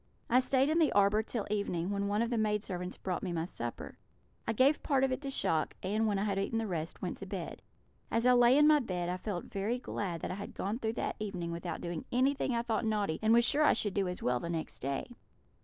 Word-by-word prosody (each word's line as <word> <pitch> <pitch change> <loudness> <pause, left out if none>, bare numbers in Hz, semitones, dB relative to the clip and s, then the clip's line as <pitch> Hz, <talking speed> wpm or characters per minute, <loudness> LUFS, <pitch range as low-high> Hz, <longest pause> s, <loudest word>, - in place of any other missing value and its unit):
I 250 - +6
stayed 265 +2 +2
in 320 +2 +2
the 315 - +4
arbour 205 +1 +4
till 220 -1 -3
evening, 190 -3 -1
when 200 0 -1
one 205 +3 +1
of 235 - -3
the 240 - +1
maid 210 -1 +1
servants 180 -2 -5
brought 185 -2 -3
me 185 - -3
my 165 -1 -1
supper. 120 -9 -6 0.5
I - - +2
gave 270 +6 +4
part 270 -2 +1
of 265 - +2
it 255 - -2
to 275 - -4
Shock, 160 -11 +1
and, 215 +4 +1
when 205 -2 +1
I 195 - 0
had 200 -2 0
eaten 200 +3 -1
the 225 - 0
rest, 170 -4 -4
went 180 - -3
to 195 - -7
bed. 185 -3 -5 0.5
As 230 +1 0
I 250 - +7
lay 245 +2 +6
in 295 - +6
my 305 0 +6
bed 180 -8 -3
I 180 - -1
felt 185 -1 -4
very 205 +5 -2
glad 190 -8 -4
that - - -3
I 190 +2 -5
had - - -8
gone 210 +5 -2
through 220 -2 -1
that - - -3
evening 185 -5 -4
without 170 0 -4
doing 170 -2 -4
anything 260 0 +1
I 235 - 0
thought 235 -1 -1
naughty, 210 -7 0
and 220 0 +3
was 235 +1 +6
sure 295 +4 +3
I - - +6
should 210 -4 0
do 200 -2 0
as 180 - -5
well 125 0 +1
the 170 - -5
next 165 -2 -3
day. 135 +1 -2
205 Hz, 260 wpm, -32 LUFS, 180-240 Hz, 0.5 s, I